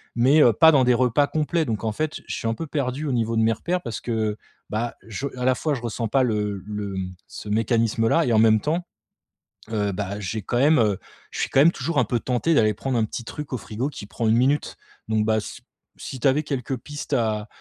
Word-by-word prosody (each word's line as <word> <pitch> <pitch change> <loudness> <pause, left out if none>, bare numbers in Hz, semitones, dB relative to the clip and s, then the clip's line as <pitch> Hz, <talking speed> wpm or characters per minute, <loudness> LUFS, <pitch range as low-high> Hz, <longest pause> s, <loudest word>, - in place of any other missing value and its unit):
mais, 135 +6 +5
heu, 120 - +6
pas 160 +8 +7
dans 135 - +5
des 125 - +4
repas 130 +3 +2
complets 160 +2 0
donc 110 -3 -3
en 110 - +1
fait, 155 +3 -3
je - - -3
suis - - -3
un - - +1
peu 165 +3 -5
perdu 140 0 -2
au 145 - -1
niveau 115 -1 0
de - - +3
mes 115 0 +3
repères 175 - -2
parce 115 -2 -5
que, 110 -3 -1 0.3
bah, 115 +2 -2
je 120 +6 -4
à 125 - -2
la 130 - +4
fois 155 +2 -1
je 120 - -6
ressens 115 -1 -3
pas 135 +1 +3
le 105 -4 -1
le 105 -2 -4
mmh, 90 -1 -4
ce - - -9
mécanisme 115 +1 +1
là - - +3
et 120 - +1
en 110 - +5
même 110 -1 +5
temps, 170 +4 -1 0.9
heu, 105 -2 0
bah, 100 +1 -4
j'ai 105 +2 -3
quand 120 - -1
même 150 +1 +5
heu, 105 -4 +2 0.3
je - - -6
suis - - -1
quand 135 - +4
même 165 +4 +6
toujours 160 -3 -1
un - - +3
peu 120 - -1
tenté 125 +8 0
d'aller 110 -5 +4
prendre 130 +3 -2
un 110 - +2
petit 115 +2 -6
truc 150 +3 -7
au 125 - 0
frigo 115 +6 -3
qui 125 - -9
prend 115 +1 -2
1 115 - +4
minute 140 +4 +1 0.3
donc 110 -1 +2
bah, 110 0 +2
c - - -9 0.4
si 130 - -7
t'avais 135 +4 +3
quelques 135 -2 -3
pistes 145 +1 -7
à 110 -3 0
120 Hz, 250 wpm, -24 LUFS, 110-140 Hz, 0.9 s, pas